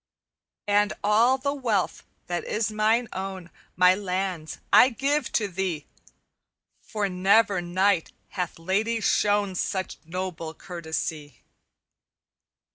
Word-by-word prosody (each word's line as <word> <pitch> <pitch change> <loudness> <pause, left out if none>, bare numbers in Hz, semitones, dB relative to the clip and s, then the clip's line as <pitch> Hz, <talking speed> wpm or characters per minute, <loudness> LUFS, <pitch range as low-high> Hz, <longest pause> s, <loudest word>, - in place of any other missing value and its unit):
"'And 205 +1 +3
all 225 +5 +4
the 280 +1 -1
wealth 230 -10 -1 0.2
that 175 0 -3
is 215 0 -1
mine 220 +3 +2
own, 190 -2 -6 0.2
My 180 0 +6
lands, 185 -4 -3 0.2
I 255 - +8
give 275 +2 -1
to 210 - +1
thee, 180 -5 -3 1.0
For 210 -3 -2
never 195 +1 +3
knight 180 0 +1 0.2
hath 180 -3 -4
lady 205 +7 0
shown 205 -2 +2
Such 185 +1 -3
noble 165 -1 -5
courtesy. 160 -4 -5
195 Hz, 110 wpm, -26 LUFS, 180-215 Hz, 1.0 s, I